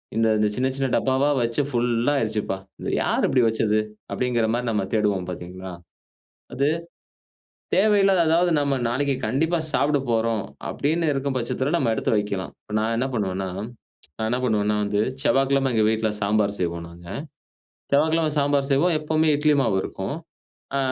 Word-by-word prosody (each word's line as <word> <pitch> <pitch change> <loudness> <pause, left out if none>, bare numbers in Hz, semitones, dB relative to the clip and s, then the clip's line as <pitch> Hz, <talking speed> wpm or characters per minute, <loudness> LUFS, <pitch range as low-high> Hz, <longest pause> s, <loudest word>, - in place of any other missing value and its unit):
இந்த, 115 0 +3
இந்த 105 - +3
சின்ன, 130 +1 +1
சின்ன 135 - 0
டப்பாவா 135 +2 +2
வச்சு 120 +4 0
ஃபுல்லா 120 +2 +1
ஆயிருச்சுப்பா! 110 -3 -2 0.2
இத - - -3
யாரு - - 0
இப்பிடி 130 -2 +3
வச்சது? 110 -1 +1 0.3
அப்பிடிங்கற 120 -3 0
மாரி 125 0 -2
நம்ம 100 -3 0
தேடுவோம் 100 -4 +1
பாத்தீங்களா? 90 +1 -8 0.8
அது 140 +2 +1 1.1
தேவையில்லாத, 195 -2 +4
அதாவது 175 +2 +3
நம்ம 140 -1 +1
நாளைக்குக் 135 +1 -1
கண்டிப்பா 165 +5 +1
சாப்புடப் 140 -3 +1
போறோம், 115 -2 +1 0.2
அப்பிடின்னு 160 +2 0
இருக்கும் 135 -1 -2
பட்சத்துல 130 +5 -2
நம்ம 115 - +1
எடுத்து - - -1
வைக்கலாம். 100 -3 -2
இப்ப 105 - -9
நான் 115 +1 0
என்ன 130 - +1
பண்ணுவேன்னா, 95 -3 -2 0.7
நான் 110 - -1
என்ன 125 - +1
பண்ணுவேன்னா 105 -2 +1
வந்து, 105 0 0 0.2
செவ்வாய்க்கிழம 135 -1 +2
எங்க 110 - +3
வீட்ல 110 0 0
சாம்பார் 105 0 +1
செய்வோம் 85 -1 -2
நாங்க. 85 0 -13 0.8
செவ்வாய்க்கிழம 160 +2 +3
சாம்பார் 140 -1 +1
செய்வோம், 165 +6 +3
எப்பவுமே 155 +1 +1
இட்லி 150 +1 +3
மாவு 95 -6 +1
இருக்கும். - - -4 0.6
அ - - +2
120 Hz, 150 wpm, -24 LUFS, 105-145 Hz, 1.1 s, தேவையில்லாத